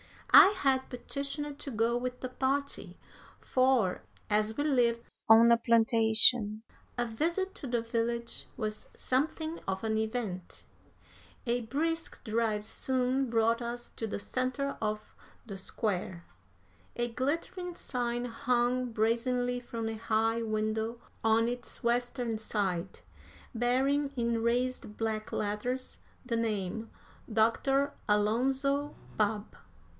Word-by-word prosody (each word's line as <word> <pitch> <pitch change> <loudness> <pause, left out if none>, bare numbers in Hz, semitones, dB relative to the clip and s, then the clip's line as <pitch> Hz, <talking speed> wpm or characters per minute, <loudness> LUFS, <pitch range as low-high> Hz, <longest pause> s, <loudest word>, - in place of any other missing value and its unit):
I - - +11
had 265 -4 +1
petitioned 280 +3 -5
to - - -6
go 230 -1 +1
with 250 +1 -3
the 255 - -4
party, 275 +2 -2 0.4
for, 255 -7 +2 0.3
as 215 +1 +1
we 290 - +1
lived 240 -5 +2 0.3
on 230 +1 +8
a 235 - +6
plantation, 225 -1 +5 0.3
a 240 - +1
visit 340 - -1
to 275 - -7
the 240 -1 0
village 235 0 -2
was 215 0 -4
something 315 +5 -1
of 190 +1 -2
an 220 -1 0
event. 220 -5 -4 0.8
A 245 0 0
brisk 325 +8 -2
drive 215 -2 0
soon 260 +2 0
brought 230 +1 +2
us 240 0 -5
to 225 - -5
the - - -3
centre 255 +5 -2
of 215 -1 -3 0.3
"the 200 -4 -7
Square." 185 -3 -3 0.7
A 240 0 -1
glittering 335 +8 -3
sign 240 -5 -2
hung 245 +1 0
brazenly 245 +2 +1
from 230 -2 -5
a 225 - -4
high 225 +1 +1
window 220 +1 -2 0.2
on 225 +1 +3
its 245 0 -5
western 240 -1 0
side, 190 -4 -2 0.5
bearing, 270 +4 +1
in 235 -2 0
raised 240 -2 -1
black 220 -1 -2
letters, 230 +5 -3 0.3
the 235 -2 -1
name, 220 -1 -2 0.4
"Doctor 270 +6 +2 0.2
Alonzo 265 +7 +1 0.2
Babb." 210 0 -1
235 Hz, 120 wpm, -30 LUFS, 220-255 Hz, 0.8 s, I